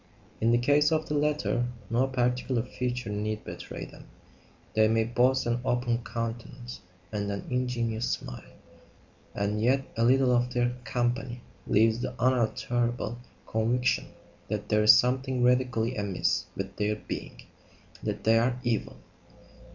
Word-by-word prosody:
In 115 - +3
the 120 - +5
case 145 +5 +3
of 155 0 +1
the 150 - -2
latter, 145 -4 +1 0.2
no 125 +3 +3
particular 125 -1 0
feature 125 -2 -3
need 105 +1 -2
betray - - -7
them; - - -14 0.7
they 110 0 +4
may 110 0 +3
boast 125 +3 +2
an 120 +1 0
open 120 -2 +1
countenance 115 +2 -5 0.3
and 105 -1 -2
an 100 - -4
ingenuous 120 -2 -1
smile; 60 - -5 0.8
and 105 +1 -1
yet 135 +3 +2
a 115 - +1
little 130 +1 +4
of 125 +1 0
their 120 0 +2
company 120 -1 -1 0.3
leaves 110 +2 +3
the 125 - -4
unalterable 120 -1 0 0.3
conviction 120 +3 +1 0.4
that 105 0 -4
there 105 0 +3
is 110 +2 +9
something 130 +1 +1
radically 125 -1 +2
amiss 90 -4 0
with 95 0 -5
their 105 0 +1
being: 105 - -7 0.6
that - - -3
they 115 0 +5
are 125 +2 +1
evil. 115 - -1
120 Hz, 140 wpm, -28 LUFS, 110-125 Hz, 0.8 s, is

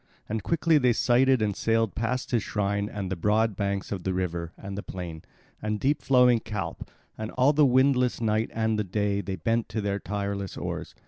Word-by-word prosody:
And 110 +1 -2
quickly 165 - +2
they 125 -3 +3
sighted 125 +1 +3
and 105 -2 0
sailed 115 -2 +1
past 120 +3 -2
his 120 -3 +2
shrine 100 0 -1
and 95 -3 -5
the - - 0
broad 105 +4 +1
banks 100 0 -2
of 100 -3 -3
the 95 +1 -2
river 85 -2 -2
and 100 0 -7
the 100 - -4
plain, 85 -5 -7 0.4
and 105 0 -2
deep 145 +4 +1
flowing 125 -3 +5
Calpe, 105 -3 -5 0.3
and 110 0 -3
all 130 +3 +4
the 150 -1 +5
windless 130 -1 +3
night 110 0 0
and 110 -1 0
the - - +1
day 100 +1 -1
they 95 0 -4
bent 115 +7 -1
to 110 - -3
their 100 -1 -1
tireless 100 -1 -4
oars. - - -5
105 Hz, 200 wpm, -27 LUFS, 100-120 Hz, 0.4 s, flowing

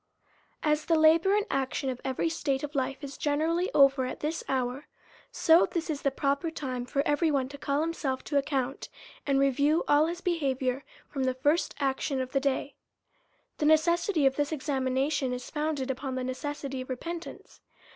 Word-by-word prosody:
As 300 0 +1
the 330 -1 +3
labour 325 +5 +5
and 420 0 +1
action 270 +1 -1
of 255 -2 -3
every 265 +5 -1
state 290 -4 -1
of 295 0 -5
life 270 +1 -2
is 275 -1 -7
generally 325 +5 +1
over 275 -1 +5
at 255 - -5
this 310 +2 -3
hour, 260 +2 -2 0.4
so 330 0 +5
this 335 -1 -2
is 290 - -4
the 275 - +2
proper 280 +4 -1
time 255 -6 -4
for 280 +2 0
every 295 +3 +2
one 275 -3 +1
to 285 - -9
call 280 +1 0
himself 300 -5 -2
to 290 - -1
account, 275 -1 -2 0.4
and 275 -1 +3
review 285 +4 +3
all 295 +2 +4
his 345 +1 -4
behaviour, 275 -7 -1 0.2
from 270 -2 -2
the 255 -1 0
first 290 +6 +1
action 270 0 -1
of 260 0 -3
the 275 - +2
day. 275 +1 -1 0.9
The 295 - +2
necessity 325 +1 +3
of 270 0 +3
this 290 0 0
examination 270 -1 0
is 250 0 -6
founded 295 -3 -1
upon 265 0 -4
the 255 - -2
necessity 270 +1 -4
of 255 - -9
repentance. 335 +7 -7
280 Hz, 180 wpm, -28 LUFS, 265-315 Hz, 0.9 s, labour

